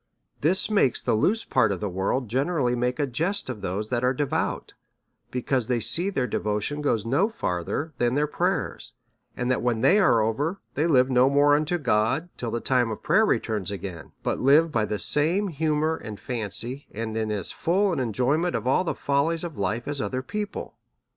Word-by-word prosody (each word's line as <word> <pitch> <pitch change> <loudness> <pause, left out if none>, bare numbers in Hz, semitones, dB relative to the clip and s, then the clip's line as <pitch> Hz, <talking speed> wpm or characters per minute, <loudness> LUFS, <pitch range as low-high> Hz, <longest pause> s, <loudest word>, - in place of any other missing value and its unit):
This 175 +6 +2
makes 200 - +3
the - - 0
loose 200 - +1
part 110 -5 +2
of 95 - -2
the 105 - -2
world 100 +7 -1
gene 130 +9 0
rally 130 -8 +1
make 125 +1 -1
a 145 - +1
jest 165 +8 -2
of 110 -5 -8
those 105 +5 -3
that 120 0 0
are 130 +1 +2
devout, 145 0 -2 0.6
because 125 -1 -1
they 125 -2 +1
see 120 - +4
their 135 -10 -1
devotion 105 +6 -2
goes 115 -7 0
no 140 - +2
further 145 - -3
than 120 +1 +1
their 145 +1 +2
prayers, 150 - -2 0.4
and 125 +1 0
that 130 - 0
when 120 -2 0
they 195 - +5
ai'e 185 - +4
over, 150 - -2
they 155 +3 +1
live 130 -4 +4
no 125 +1 +5
more 145 +1 +4
unto 155 +4 0
God 125 +4 0
till 120 - -3
the 120 +1 -2
time 125 -1 +1
of 110 - -6
prayer - - +3
returns 105 -5 -1
again, 95 -6 -7
but - - -1
live 150 +5 +4
by 110 -6 +1
the 105 - -2
same 165 - +1
humour 155 0 0
and 105 -7 -8
fancy, 120 +3 -3
and 110 +1 -5
in 110 -1 -1
as 100 -4 -2
full 190 +3 +1
an - - -2
enjoy 125 +4 +1
ment 175 +1 -1
of - - -3
all 130 +8 +3
the 175 - -2
follies 155 +4 0
of 170 -4 -5
life, 105 +5 -2
as 145 -2 -3
other 130 +5 -3
people. 210 +8 -5
130 Hz, 205 wpm, -25 LUFS, 110-155 Hz, 0.6 s, they